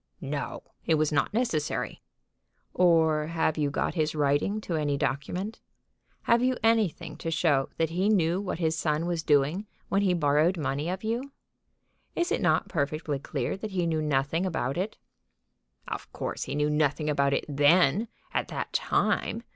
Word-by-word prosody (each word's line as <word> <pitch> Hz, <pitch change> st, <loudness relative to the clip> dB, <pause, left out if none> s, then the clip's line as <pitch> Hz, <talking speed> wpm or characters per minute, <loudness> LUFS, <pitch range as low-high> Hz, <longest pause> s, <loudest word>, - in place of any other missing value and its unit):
"No; -, -, -4 dB, 0.2 s
it 160 Hz, -, +2 dB
was 155 Hz, 0 st, +1 dB
not 145 Hz, -2 st, +1 dB
necessary." 210 Hz, -10 st, -1 dB, 0.7 s
"Or 160 Hz, -4 st, +3 dB
have 160 Hz, -1 st, 0 dB
you 150 Hz, -2 st, 0 dB
got 140 Hz, -, -1 dB
his 155 Hz, -2 st, 0 dB
writing 145 Hz, +8 st, +1 dB
to 175 Hz, -, -3 dB
any 145 Hz, -2 st, 0 dB
document? 180 Hz, -, -2 dB, 0.6 s
Have 235 Hz, 0 st, +3 dB
you 255 Hz, 0 st, +2 dB
anything 225 Hz, -7 st, +1 dB
to 165 Hz, -, -4 dB
show 155 Hz, -4 st, +2 dB
that 165 Hz, -1 st, 0 dB
he 185 Hz, +5 st, +1 dB
knew 180 Hz, -3 st, +2 dB
what 185 Hz, -4 st, -3 dB
his 160 Hz, -2 st, 0 dB
son 155 Hz, 0 st, 0 dB
was 170 Hz, -2 st, -1 dB
doing 150 Hz, +7 st, +2 dB, 0.2 s
when 195 Hz, -, +2 dB
he 185 Hz, -3 st, +2 dB
borrowed 155 Hz, +3 st, +3 dB
money 145 Hz, +1 st, -2 dB
of 185 Hz, +3 st, -4 dB
you? 240 Hz, +5 st, -2 dB, 0.8 s
Is 345 Hz, +2 st, 0 dB
it 445 Hz, -, +1 dB
not -, -, +2 dB
perfectly 150 Hz, -2 st, -2 dB
clear 135 Hz, -2 st, -3 dB
that 210 Hz, 0 st, -6 dB
he 180 Hz, -2 st, +1 dB
knew 160 Hz, -2 st, 0 dB
nothing 150 Hz, +3 st, 0 dB
about 150 Hz, -8 st, -1 dB
it?" 190 Hz, +5 st, -3 dB, 0.9 s
"Of -, -, -6 dB
course -, -, -4 dB
he -, -, -4 dB
knew 150 Hz, 0 st, +1 dB
nothing 150 Hz, 0 st, +1 dB
about 140 Hz, -2 st, +2 dB
it -, -, -2 dB
then, 150 Hz, +7 st, +4 dB, 0.3 s
at -, -, 0 dB
that -, -, -5 dB
time. 230 Hz, -, 0 dB
160 Hz, 170 wpm, -28 LUFS, 150-190 Hz, 0.9 s, then